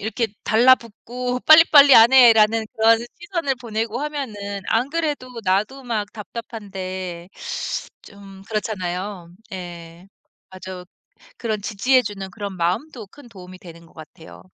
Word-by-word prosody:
이렇게 225 +2 -2 0.2
달라붙고 245 +1 +1
'빨리빨리 310 -3 +8
안 230 +3 +7
해.'라는 225 -3 +6
그런 225 +1 +4 0.2
시선을 340 -7 -2
보내고 230 0 -4
하면은 220 -10 -5
안 230 +4 +1
그래도 300 -5 -3 0.2
나도 210 +8 -1
막 210 -3 -3
답답한데 190 -5 -7 0.7
좀 195 -1 -14
그렇잖아요. 190 -4 -4 0.2
예. 175 -1 -9 0.4
맞아요. 185 -1 -9 0.5
그런 220 -3 -3
지지해 250 +6 +2
주는 200 -3 -7
그런 200 -1 -7
마음도 205 - -3
큰 265 +4 -16
도움이 185 -4 -13
되는 170 -2 -14
것 - - -24
같아요. 160 +1 -14
215 Hz, 285 characters per minute, -21 LUFS, 185-245 Hz, 0.7 s, 빨리빨리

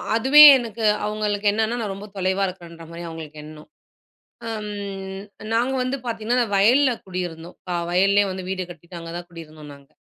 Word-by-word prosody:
அதுவே 265 +6 +7 0.2
எனக்கு 230 -2 -6 0.2
அவங்களுக்கு 210 -1 -1
என்னன்னா 220 +3 -1
நான் 205 -3 -3
ரொம்ப 200 +2 -9
தொலைவா 190 +1 0
இருக்குறேன்ற 170 -3 -10
மாரி 170 +1 -8
அவங்களுக்கு 155 -2 -9
எண்ணம். 155 0 -13 0.8
அம் 215 -2 -5 0.9
நாங்க 240 +3 +1
வந்து 255 +2 -2
பார்த்தீங்கன்னா, 235 +2 0
வயல்ல 255 +7 +4 0.2
குடியிருந்தோம். 175 -2 -6 0.2
அ - - -2 0.2
வயல்லேயே 200 +2 +3
வந்து 185 0 -6
வீடு 185 -2 -4
கட்டிட்டு 170 +1 -11
அங்க 165 0 -8
தான் 175 - -9
குடியிருந்தோம் 155 -3 -11
நாங்க. 140 +1 -20
190 Hz, 155 wpm, -22 LUFS, 170-220 Hz, 0.9 s, அதுவே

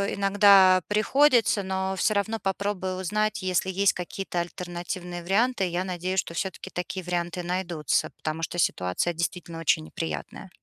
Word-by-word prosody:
иногда 195 -2 +6
приходится, 225 0 +3
но 190 0 -2
всё 215 - +1
равно 220 +2 0
попробуй 190 -1 -2
узнать, 215 +2 -1
если 185 0 0
есть 195 +1 +3
какие-то 180 0 -5
альтернативные 175 0 -5
варианты. 210 +5 +1
Я 175 +1 -1
надеюсь, 185 0 -2
что 170 - -3
всё-таки 190 +2 -4
такие 180 +1 -4
варианты 175 0 -2
найдутся, 170 -4 -1
потому 155 +1 -4
что 175 - -3
ситуация 90 - 0
действительно 170 0 -4
очень 155 - +2
неприятная. 80 -1 -6
185 Hz, 140 wpm, -26 LUFS, 175-200 Hz, -, иногда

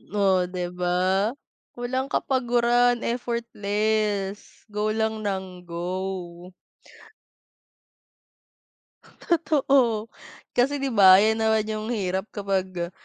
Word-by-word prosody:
Oh 190 -3 +2
'di 180 -1 -3
ba. 185 +3 +1 0.5
Walang 255 +2 -2
kapaguran, 245 -2 +2
effortless, 215 -4 -2
go 210 +1 0
lang 220 0 -1
nang 190 -3 -4
go. 180 0 -5 2.5
Totoo, 270 -9 +1 0.5
kasi 275 +4 +2
'di 275 - -1
ba 190 -2 +8
yan 220 +1 +2
naman 220 -1 +2
yung 215 0 -4
hirap 190 -3 -2
kapag 190 -4 -2
210 Hz, 85 wpm, -25 LUFS, 190-235 Hz, 2.5 s, ba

